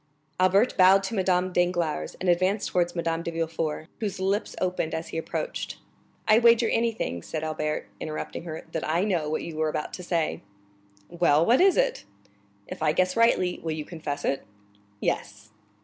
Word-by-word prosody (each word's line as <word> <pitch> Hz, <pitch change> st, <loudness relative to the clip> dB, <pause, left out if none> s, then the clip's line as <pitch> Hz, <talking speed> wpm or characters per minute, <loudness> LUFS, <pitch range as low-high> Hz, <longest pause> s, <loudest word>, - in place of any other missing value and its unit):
Albert 195 Hz, +6 st, +4 dB
bowed 190 Hz, +1 st, +6 dB
to 195 Hz, -, -4 dB
Madame 185 Hz, -2 st, +1 dB
Danglars, 175 Hz, -, 0 dB
and 185 Hz, -, -3 dB
advanced 185 Hz, +4 st, +2 dB
towards 175 Hz, -1 st, 0 dB
Madame 165 Hz, -1 st, -1 dB
de 170 Hz, -, -4 dB
Villefort, 165 Hz, -1 st, -3 dB
whose 205 Hz, -4 st, -3 dB
lips 200 Hz, +3 st, -1 dB
opened 180 Hz, -3 st, -1 dB
as 160 Hz, +1 st, -5 dB
he -, -, -5 dB
approached. -, -, -4 dB, 0.5 s
"I 215 Hz, +1 st, +6 dB
wager 235 Hz, 0 st, +5 dB
anything," 225 Hz, -, -1 dB
said 155 Hz, -, -5 dB
Albert, 155 Hz, -1 st, -2 dB
interrupting 155 Hz, +1 st, -5 dB
her, 160 Hz, -1 st, -6 dB
"that 160 Hz, -, -3 dB
I 170 Hz, +4 st, +2 dB
know 175 Hz, -7 st, 0 dB
what 155 Hz, -, -2 dB
you 160 Hz, -2 st, -7 dB
were 155 Hz, 0 st, +1 dB
about 150 Hz, -, -4 dB
to -, -, -6 dB
say." 170 Hz, -3 st, -1 dB, 0.7 s
"Well, 165 Hz, 0 st, +3 dB
what 245 Hz, -, +4 dB
is 385 Hz, 0 st, +5 dB
it?" -, -, +1 dB, 0.6 s
"If -, -, -8 dB
I 155 Hz, -1 st, +3 dB
guess 185 Hz, +2 st, +1 dB
rightly, 230 Hz, -6 st, +3 dB
will 160 Hz, -1 st, -2 dB
you 155 Hz, -1 st, -5 dB
confess 155 Hz, -4 st, -5 dB
it?" 135 Hz, -, 0 dB, 0.6 s
"Yes." 105 Hz, +1 st, -3 dB
175 Hz, 175 wpm, -26 LUFS, 155-195 Hz, 0.7 s, bowed